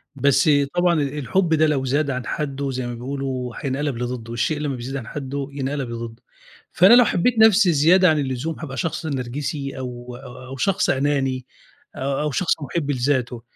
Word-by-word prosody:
بس 140 +4 +3 0.3
طبعًا 175 0 +3
ال 140 +1 -3
الحُب 165 +6 +1
ده 155 0 +4
لو 135 -3 0
زاد 140 +3 +1
عن 125 -2 -3
حدُّه 140 -1 -3
زي 125 -1 -3
ما 120 - -4
بيقولوا 130 0 -4
هينقلب 140 -1 -2
لضدُّه، 120 -1 -4
"الشيء 145 +6 -1
لمّا 145 -3 -2
بيزيد 125 +3 -6
عن 120 -5 -5
حدُّه 140 0 -4
ينقلب 140 -2 -3
لضدُّه." 115 0 -7 0.5
فأنا 185 +6 +6
لو 245 -1 +8
حبّيت 225 +7 +1
نَفْسي 210 -4 +6
زيادة 175 +5 +5
عن 155 -1 +2
اللزوم 135 +4 -3
هابقى 135 -5 -6
شخص 165 +5 -2
نرجسي، 140 0 -4
أو 125 -1 -7
أو 130 0 -11
أو 135 +1 -8
شخص 195 +7 +1
أناني 135 -2 0 0.5
أ - - -8 0.2
أو 150 - -1
شخص 170 +6 +1
مُحِب 145 +1 -2
لذاته، 125 -2 -1
140 Hz, 180 wpm, -22 LUFS, 125-150 Hz, 0.5 s, لو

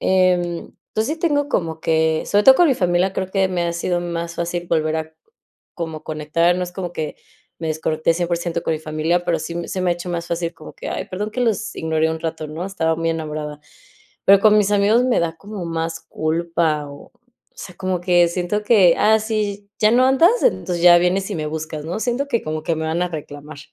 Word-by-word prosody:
Em, 180 -2 +1 0.2
entonces, 220 +1 -1
sí 325 - -18
tengo 290 -4 +1
como 160 -3 -1
que, 160 0 +1
sobre 205 0 +2
todo 265 - +9
con 350 - +5
mi - - +4
familia 180 0 +1
creo 190 -1 -3
que 195 -1 +2
me 175 -2 -1
ha 170 - -1
sido 175 +1 -1
más 170 -1 -4
fácil 175 0 -3
volver 155 -1 +1
a 160 0 -5 0.6
como 160 -3 -5
conectar, 160 +3 +1
no 180 - -2
es 180 - -9
como 180 -2 -5
que 155 -2 -4 0.4
me 165 - -4
desconecté 155 +1 0
100% 170 -1 -2
con 160 - -1
mi - - -4
familia, 155 +3 0
pero, 165 - +1
sí 170 - -5
m 170 - -4
se 185 - -3
me 180 - +2
ha - - +2
hecho 175 +1 -8
más 170 0 -3
fácil, 170 0 -2
como - - -12
que: - - -7
"Ay, - - -3
perdón 205 +3 -4
que 250 - -3
los 225 0 -1
ignoré 160 0 0
un 160 - -3
rato, 160 -1 -4
¿no? 160 +4 -5
Estaba 165 -4 -1
muy 165 0 0
enamorada". 150 -2 -5 0.7
Pero, 195 0 +7
con 215 -1 +6
mis 205 -1 +2
amigos 210 +5 +3
me 255 - +2
da 165 -1 -2
como 205 +1 -7
más 165 0 -3
culpa 160 -1 -1
o, 140 0 -12
o - - -34 0.4
sea, 180 - -10
como 185 -2 -2
que 175 -1 +4
siento 180 +4 -2
que: 200 -6 +5
"Ah, 220 +1 +4
sí, 210 -2 -3
ya 215 0 +4
no 250 +2 +4
andas, 330 - +4
entonces 180 - +1
ya 175 -1 +9
vienes 190 +3 0
y - - -2
me 155 - -3
buscas, 155 0 -5
¿no?". 175 +6 -3
Siento 255 +4 -1
que, 235 -5 0
como 155 0 -3
que 165 0 0
me 160 - -3
van 160 +2 -1
a - - -1
reclamar. 150 -1 -8
175 Hz, 230 wpm, -20 LUFS, 160-195 Hz, 0.7 s, todo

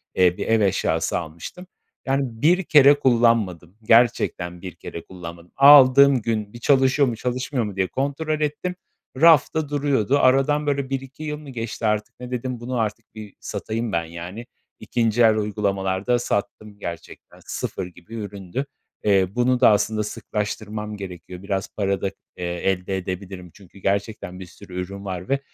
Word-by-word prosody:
eee, 90 -1 +3
bir - - -4
ev 115 -1 +3
eşyası 90 -5 +1
almıştım. 85 - -9 0.4
Yani, 135 +1 +1 0.2
bir 180 +5 +4
kere 145 -3 +6
kullanmadım, 115 - +2
gerçekten 110 -7 +2
bir 90 -3 -8
kere 85 - -8
kullanmadım. 85 -1 -10
Aldığım 140 -1 +8
gün 110 -2 -2
bir 120 - -9
çalışıyor 135 +2 +3
mu, 120 - -2
çalışmıyor 125 +1 -2
mu 105 -2 -6
diye 95 -1 0
kontrol 145 - -2
ettim. 150 +5 -2 0.5
Rafta 160 -2 +5
duruyordu. 140 -3 +1
Aradan, 135 +3 +3
böyle, 140 -2 0
1-2 135 +2 -5
yıl 150 -1 -3
mı 150 -1 -11
geçti 115 -2 -5
artık, 105 +2 -1
ne 125 0 -8
dedim, 125 0 -3
bunu 125 +1 -3
artık 110 0 -4
bir 105 -2 -9
satayım 115 +1 -4
ben, 85 -3 0
yani, 85 +7 -8 0.3
2'nci 115 -1 0
el 110 -2 +6
uygulamalar 100 -2 -1
da 120 -1 +3
sattım 105 -2 -3
gerçekten, 85 -4 -9
sıfır - - -4
gibi 90 +4 -15
üründü. 100 +3 -5 0.4
Eee, 100 -3 +3
bunu 125 +1 +2
da 125 - +7
aslında 105 +1 +1
sıklaştırmam 105 0 -4
gerekiyor. 90 -1 -9
Biraz 100 -1 -2
para 100 -2 0
da, - - 0 0.3
eee, 90 - -4
elde 90 +2 -1
edebilirim 90 -1 -6
çünkü 100 -1 -17
gerçekten 100 -2 -2
bir 95 - -7
sürü 90 +1 -8
ürün 100 +2 -7
var 90 -1 -5
ve, 135 - +2
110 Hz, 160 wpm, -23 LUFS, 95-130 Hz, 0.5 s, Aldığım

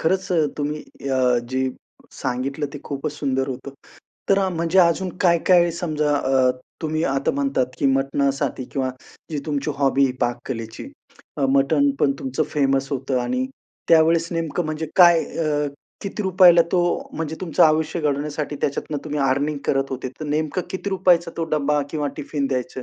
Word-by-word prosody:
खरंच 190 +3 0 0.3
तुम्ही 150 +1 -2 0.3
अ, 125 -2 +3
जे 130 0 0 0.4
सांगितलं 135 +4 -3
ते 145 - -6
खूपच 140 +1 -4
सुंदर 135 -2 -1
होतं. 135 +2 -6 0.6
तर 195 -1 +3
म्हणजे 170 +3 +1
अजून 180 +1 +4
काय-काय 175 -1 +4
समजा 150 -3 0
अ, 130 -2 +3 0.3
तुम्ही 155 0 -1
आता 135 0 +1
म्हणतात 140 -2 +1
की 140 - +2
मटणासाठी 135 0 0
किंवा 130 -2 -1 0.4
जी 150 - -2
तुमची 150 0 -1
हॉबी 140 0 +3
आहे 130 - +1
पाककलेची, 120 -2 -3 0.7
मटण 140 +1 +3
पण 140 - +4
तुमचं 135 +4 -2
फेमस 135 -2 +1
होतं 130 -1 -1
आणि 255 - -1 0.4
त्यावेळेस 165 0 +4
नेमकं 165 +1 -2
म्हणजे 155 +1 -3
काय 175 -3 +7
अ, 150 -2 -1 0.4
किती 205 +1 -4
रुपयाला 180 -2 +6
तो 180 - +4 0.4
म्हणजे 160 0 -3
तुमचं 175 -4 +1
आयुष्य 160 +1 +1
घडवण्यासाठी 150 0 -2
त्याच्यातनं 145 +1 -2
तुम्ही 150 -1 -3
अर्निंग 140 +2 +1
करत 135 0 +2
होते. 130 -1 -4
तर - - -3
नेमकं 155 +4 -1
किती 190 +1 -4
रुपयाचा 180 -3 +3
तो 165 - -1
डब्बा 150 0 +1
किंवा 150 -2 -2
टिफिन 140 -1 -2
द्यायचं 130 -1 -3
150 Hz, 150 wpm, -22 LUFS, 135-165 Hz, 0.7 s, काय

